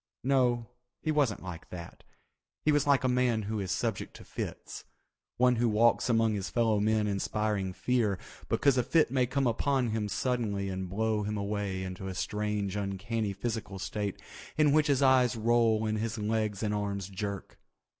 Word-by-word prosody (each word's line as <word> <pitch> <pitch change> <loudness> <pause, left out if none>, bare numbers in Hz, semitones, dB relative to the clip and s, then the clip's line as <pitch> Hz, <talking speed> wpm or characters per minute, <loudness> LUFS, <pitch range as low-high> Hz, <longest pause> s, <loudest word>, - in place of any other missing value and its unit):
No, 125 -3 +2 0.4
he 155 - +1
wasn't 140 -11 +1
like 90 -3 -8
that—he 90 - -7
was 145 -1 +2
like 140 -1 +4
a - - +3
man 125 -3 +2
who 105 +1 -3
is 95 -2 -3
subject - - -2
to - - -11
fits, - - -6 0.5
one 125 -1 +4
who 120 0 +2
walks 115 +3 +3
among 115 -2 +3
his 100 -2 -3
fellow 115 -3 +2
men 110 +1 +2
inspiring 105 -1 -1
fear 110 -1 0 0.3
because 140 -3 +3
a - - +2
fit 160 -1 +3
may 130 -2 +2
come 135 +2 0
upon 125 +1 +1
him 105 -1 -1
suddenly 100 -3 -1
and 95 -1 -4
blow 110 +2 0
him 105 +1 -2
away 100 -2 -2
into 95 +1 -6
a 95 - -5
strange 105 0 -2
uncanny 100 +2 -2
physical 105 0 -4
state 100 +1 -3 0.4
in 150 -2 +5
which 155 +1 +4
his 140 -1 +3
eyes 130 -2 +4
roll 115 -1 +2
and 110 0 0
his 115 +1 -2
legs 105 -1 -1
and 105 -1 0
arms 100 -2 -2
jerk. 100 0 -5
110 Hz, 175 wpm, -30 LUFS, 100-125 Hz, 0.5 s, in